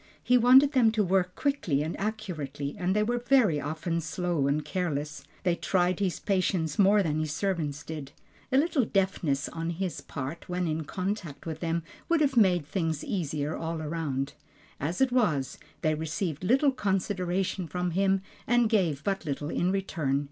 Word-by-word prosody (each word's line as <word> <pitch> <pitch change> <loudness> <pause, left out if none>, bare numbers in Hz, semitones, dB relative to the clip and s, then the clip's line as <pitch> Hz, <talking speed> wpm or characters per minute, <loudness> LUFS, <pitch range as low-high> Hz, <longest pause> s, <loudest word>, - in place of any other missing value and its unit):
He 250 - +4
wanted 255 +4 +7
them 245 -6 +4
to 215 -2 +2
work 180 -1 +1
quickly 185 - 0
and 160 - -3
accurately 165 -10 -4
and 185 +2 0
they 210 - +3
were 240 +3 0
very 240 - +3
often 165 +2 -2
slow 160 -2 -1
and 145 +2 0
careless; 150 -6 -3 0.2
they 180 - +3
tried 180 0 +1
his 190 -3 -1
patience 185 -5 0
more 200 +1 +5
than 155 -3 0
his 155 -1 -2
servants 155 -5 -2
did. 150 -4 -7 0.4
A 260 - +4
little 295 -2 +3
deftness 185 -9 0
on 165 0 -4
his 175 +1 -3
part 140 +5 -6
when 180 0 -1
in 155 0 -2
contact 185 -4 -4
with 160 -1 -4
them, 170 0 -1 0.3
would 335 -1 +4
have 280 -3 +2
made 185 -8 +4
things 160 -2 -2
easier 155 - -2
all 165 0 -3
around. 150 -4 -2 0.5
As 165 - -2
it 265 -1 +4
was, 170 - +1 0.2
they 155 - +3
received 160 +1 -3
little 270 +8 +4
consideration 190 -4 -1
from 180 +1 -2
him, 195 +2 +2 0.2
and 240 -1 +3
gave 165 -10 +1
but 195 -2 -1
little 145 0 -3
in 180 +1 +1
return. 160 -8 0
180 Hz, 170 wpm, -28 LUFS, 155-200 Hz, 0.5 s, wanted